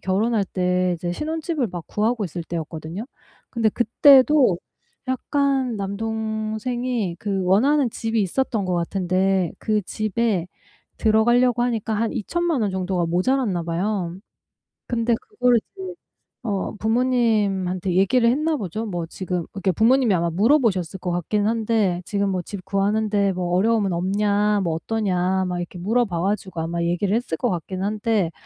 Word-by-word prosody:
결혼할 205 +3 +1
때 180 -1 0
이제 175 +1 -3
신혼집을 315 - -2
막 175 -3 -7
구하고 220 +1 0
있을 175 0 -5
때였거든요. 165 +3 -5 0.5
근데 230 -3 +1
그때도 255 - +5 0.5
약간 265 -1 0
남동생이 220 +1 -2
그 195 -2 -1
원하는 255 +9 +3
집이 225 0 -1
있었던 220 +1 -1
것 185 -1 -1
같은데 185 +1 0
그 215 -1 0
집에 215 -2 -1 0.5
들어가려고 240 +2 +3
하니까 225 -3 -1
한 225 +2 0
20,000,000 335 - -1
원 205 - 0
정도가 185 -2 -1
모자랐나 185 +1 +1
봐요. 175 +1 -2 0.7
근데 235 0 +1
그거를 250 - +2
이제 380 - -9 0.5
어 205 -3 -2
부모님한테 210 -6 +1
얘기를 235 +5 +4
했나 305 +5 +1
보죠. 215 - -4
뭐 175 -5 -3
지금 180 0 -4
이게 195 -1 +1
부모님이 235 +4 +3
아마 170 -1 +1
물어보셨을 195 - +2
것 180 -1 -3
같긴 205 +5 0
한데 220 -5 +1
"지금 200 +1 0
뭐 185 -2 -1
집 185 +1 -8
구하는데 200 +1 +1
어려움은 190 +3 +1
없냐? 205 +3 +1
뭐 165 - 0
어떠냐?" 190 -1 0
막 180 - -2
이렇게 175 +1 -6
물어봐 200 -3 0
가지고 190 -3 -2
아마 170 +1 -2
얘기를 180 +4 0
했을 225 -9 -2
것 - - 0
같긴 185 +2 -4
한데 210 -3 0
205 Hz, 310 characters per minute, -23 LUFS, 180-230 Hz, 0.7 s, 그때도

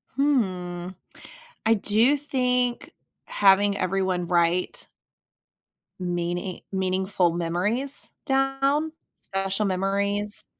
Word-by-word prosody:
Hmm. 185 -11 0 0.8
I 225 - +5
do 225 +7 +3
think 250 -3 -1 0.3
having 200 0 +4
everyone 185 -1 -1
write 175 0 +1 1.1
meaning 175 +1 -3
meaningful 190 -1 +1
memories 185 +11 0
down? 270 +3 +1 0.2
Special 195 +2 -1
memories. 200 +2 0
195 Hz, 75 wpm, -25 LUFS, 180-245 Hz, 1.1 s, I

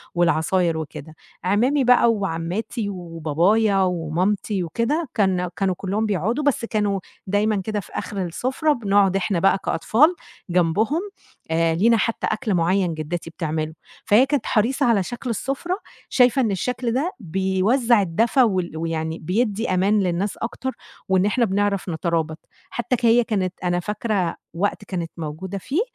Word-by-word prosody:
والعصاير 170 0 +2
وكده، 155 0 -7 0.3
عمامي 240 +10 +2
بقى 245 -1 +5
وعمّاتي 200 +3 -3
وبابايا 180 +4 +1
ومامتي 180 +3 0
وكده 230 - -1
كان 185 -4 +1
كانوا 190 +1 0
كُلّهم 200 +3 -1
بيقعدوا 215 - 0
بس 285 -5 +1
كانوا 210 -3 0 0.3
دايمًا 205 +1 +1
كده 210 +2 -2
في 195 - -11
آخر 200 -2 -4
السفرة 260 - 0
بنقعُد 200 -5 +2
إحنا 195 -1 0
بقى 195 +2 +4
كأطفال 295 - +3 0.3
جنبهم 180 - +2 0.5
آآ، 165 0 +2
لينا 230 +7 +4
حتى 230 +1 -1
أكل 215 -1 -1
معيّن 180 +1 +2
جدّتي 160 +2 -4
بتعمله، 155 -1 -3 0.3
فهي 220 +6 +5
كانت 280 -3 -1
حريصة 255 +6 +1
على 225 -5 +3
شكل 240 +5 -6
السفرة 275 - -2 0.3
شايفة 250 +1 +4
إن 225 -4 +1
الشكل 245 +5 -2
ده 295 +9 0
بيوزّع 195 +6 +2
الدفا 225 +9 +2
وال 185 -7 0
ويعني 160 0 -3
بيدّي 210 +5 -1
أمان 195 +3 +3
للناس 190 +2 -1
أكتر 250 +3 -4 0.4
وإن 190 0 +3
إحنا 235 +4 +2
بنعرف 200 -1 0
نترابط 160 -1 -1 0.3
حتى 240 +1 -1
ك 240 - -2
هي 235 +1 +5
كانت 190 -5 -1
أنا 175 0 +1
فاكرة 205 -1 -1 0.2
وقت 200 +4 -1
كانت 175 -4 -4
موجودة 165 +5 -5
فيه 275 - -1
200 Hz, 145 wpm, -22 LUFS, 175-230 Hz, 0.5 s, بقى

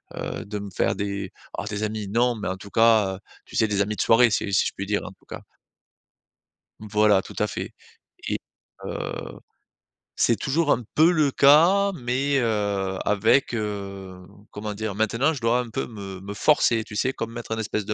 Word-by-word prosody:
heu, - - -5
de 105 0 -5
me 100 0 -7
faire - - +1
des 100 -1 -3 0.3
alors, 105 - -4
des 105 0 -3
amis, 110 -1 -3
non, 120 +4 +2
mais, 105 - -5
en 95 - -2
tout 100 +2 -11
cas, 110 -4 +4
heu, - - -11 0.3
tu - - -7
sais, 110 - +4
des 100 -1 0
amis 105 +1 -1
de - - 0
soirée, 120 +1 +5
si 100 -1 -1
si 95 - +3
je - - -1
puis 100 - -4
dire, 105 +1 -1
en - - -7
tout 95 - -23
cas. - - -8 1.4
Voilà, 105 -1 +3
tout - - -12
à - - +2
fait - - -6 0.5
et, - - 0 0.5
heu, - - -5 0.8
c'est 115 - +3
toujours 150 +2 +1
un 120 - +1
peu 160 +3 +6
le 150 -5 +2
cas, 170 +10 +5
mais, 135 +1 0
heu, 100 -5 -1
avec, 105 +6 +3
heu, 100 -3 -5 0.3
comment 105 0 -5
dire? 110 -1 -3
Maintenant, 115 +8 +1
je 135 - -7
dois 115 +2 +2
un 125 -2 -4
peu 110 - -3
me 100 -4 -8
me 100 +1 -6
forcer, 115 -2 +3
tu 105 - -10
sais? 130 +5 0
Comme 115 -2 -5
mettre 120 -1 -8
un 115 - -1
espèce 105 -2 -2
de, 105 - -2
110 Hz, 205 wpm, -24 LUFS, 100-120 Hz, 1.4 s, peu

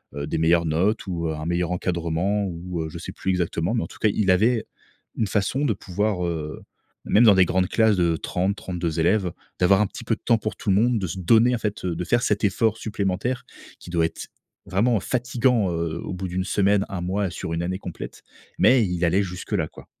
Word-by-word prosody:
heu, 70 0 -3
des 75 - -2
meilleures 85 +1 +3
notes 90 +9 +1
ou, 85 -3 -2
heu, 80 - -2
un 75 - -6
meilleur 85 +1 0
encadrement 90 +3 -1
ou, 85 -1 -5
heu, 80 - -4
je - - -8
sais - - -7
plus - - -5
exactement 90 +2 0
mais 115 - 0
en - - -5
tout - - -15
cas, 110 - +3
il 100 -2 +2
avait 110 +5 +3 0.5
une 110 - +1
façon 105 +8 0
de 115 - +2
pouvoir 95 0 -2
heu, 80 -3 -4 0.4
même 115 +3 +5
dans 105 -3 +7
des 95 - +6
grandes 90 +1 +1
classes 110 -3 +3
de 85 -2 +2
30-32 90 -3 -2
élèves, 90 +2 +2 0.3
d'avoir 95 +2 +5
un 105 - +2
petit - - -9
peu - - 0
de - - -23
temps 115 - +4
pour 110 0 -4
tout 105 - -4
le - - +4
monde, 120 +3 +3
de 95 - -2
se 95 +3 -5
donner 115 +7 +4
en - - -4
fait, 105 -3 -3
de 90 0 -2
faire 120 +5 +2
cet 105 -3 0
effort 110 +2 +2
supplémentaire 110 +4 -2 0.3
qui 90 - -11
doit 85 -2 +2
être, 80 - -5 0.4
vraiment 105 +4 +2
fatigant, 120 -2 +1
heu, 85 -1 -2
au - - -5
bout 95 +1 -4
d' 90 - -8
1 95 0 0
semaine, 100 0 +2
1 95 - -4
mois, 95 +2 -1
sur 85 -1 -5
1 85 +1 -1
année 95 +1 -2
complète. 90 -4 -8 0.4
Mais 125 -4 +5
il 90 -1 0
allait 90 +4 +2
jusque 90 +2 -6
là, 85 -7 +1
quoi. - - -14
95 Hz, 230 wpm, -24 LUFS, 85-105 Hz, 0.5 s, dans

